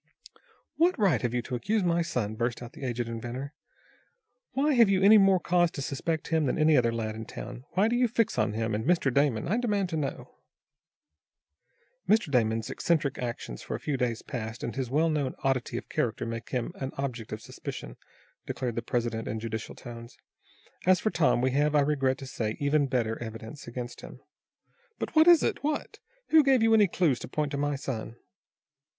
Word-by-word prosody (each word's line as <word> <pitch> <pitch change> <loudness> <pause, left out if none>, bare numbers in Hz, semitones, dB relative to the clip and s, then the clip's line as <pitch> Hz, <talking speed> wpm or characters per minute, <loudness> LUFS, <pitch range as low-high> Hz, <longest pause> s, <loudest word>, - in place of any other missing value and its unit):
"What 350 +3 +3
right 180 - +3
have 120 - -1
you 120 - 0
to 130 - -8
accuse 205 - 0
my 170 -1 +2
son?" 115 -10 -2
burst 120 +2 -2
out 120 - -10
the - - -10
aged 120 -2 -2
inventor. 120 +5 -5 1.0
"Why 285 +4 +2
have 235 -5 +6
you 190 -1 +2
any 210 +2 +8
more 195 -1 +5
cause 175 0 +2
to 140 - -5
suspect 155 +4 -3
him 160 -3 +2
than - - 0
any 155 0 +4
other 120 -3 +3
lad 110 -2 -3
in 110 +1 -6
town? 125 +4 -8
Why 195 +4 +3
do 235 - +1
you 245 0 +3
fix 230 -1 0
on 105 - +1
him, 110 0 -1
and 105 +1 -1
Mr. 145 -3 +2
Damon? 140 -5 +2
I 205 +7 +1
demand 205 -6 0
to 160 - -2
know." 145 -3 -5 1.7
"Mr. 210 -8 +3
Damon's 115 -3 +1
eccentric 155 -5 0
actions 120 - -5
for - - -4
a - - -5
few 150 - -2
days 125 -3 -1
past, 115 -1 -6
and 115 - -4
his 130 -3 -2
well 155 +5 +2
known 145 -5 -1
oddity 135 -3 0
of - - -6
character - - -1
make 115 0 -5
him 125 +4 -2
an 135 - -3
object 125 -5 -4
of 110 - -4
suspicion," - - -8 0.5
declared 125 -2 -3
the - - +1
president 115 -1 -2
in 110 +1 -3
judicial 110 0 -5
tones. 115 0 -10 0.7
"As 185 0 +6
for 215 - 0
Tom, 155 -7 +2
we 130 +1 +2
have, 145 +3 +2
I 145 - +6
regret 135 -2 +1
to 135 - -8
say, 110 -4 -3
even 145 0 +2
better 120 -4 -1
evidence 115 +4 -8
against 120 0 -6
him." - - -11 0.8
"But - - -5
what 315 +1 +6
is 345 -3 +8
it? - - -1
What? 300 +1 -2 0.3
Who 315 -1 +7
gave 265 -4 +4
you 225 0 +4
any 210 -2 +6
clues 165 -7 +1
to - - -7
point 150 +3 -2
to 140 - -2
my 145 0 0
son?" 120 -4 -5
135 Hz, 205 wpm, -28 LUFS, 115-175 Hz, 1.7 s, any